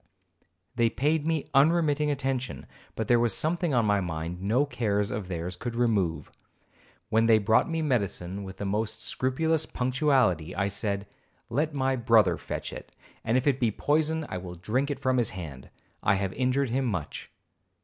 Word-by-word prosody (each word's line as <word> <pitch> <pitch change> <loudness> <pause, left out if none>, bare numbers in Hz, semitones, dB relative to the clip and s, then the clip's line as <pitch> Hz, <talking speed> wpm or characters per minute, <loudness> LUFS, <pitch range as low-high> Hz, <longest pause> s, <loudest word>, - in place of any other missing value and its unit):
They 120 -2 +2
paid 150 +5 0
me 160 -3 0
unremitting 150 0 +3
attention, 135 -3 -2 0.3
but 110 - -3
there 120 -1 +4
was 120 -1 +2
something 170 +1 0
on 120 -2 +3
my 105 -1 +3
mind 85 0 -4
no 115 +9 +2
cares 105 -7 -1
of 100 -3 -4
theirs 90 0 -4
could 120 +5 -5
remove. 105 -9 0 0.8
When 115 0 +3
they 115 -1 +6
brought 110 +7 +3
me 165 -1 -1
medicine 100 - -1
with 95 -1 -9
the 100 - -4
most 105 +2 -2
scrupulous 160 +5 0
punctuality, 125 - +1
I 100 +2 0
said, 100 0 -2 0.5
'Let 150 +5 0
my 135 -1 +1
brother 110 -7 +4
fetch - - -6
it, - - -9 0.3
and 115 +2 +2
if 130 - 0
it 140 -2 +2
be 120 - +2
poison 155 +7 0
I 95 - -4
will 90 -1 -8
drink 120 - -1
it 145 - -2
from 130 0 +1
his 120 -3 +1
hand; 75 -8 -8 0.3
I 100 - +3
have 95 -1 -2
injured 130 0 0
him 130 +2 0
much.' 90 - -4
115 Hz, 175 wpm, -27 LUFS, 100-140 Hz, 0.8 s, they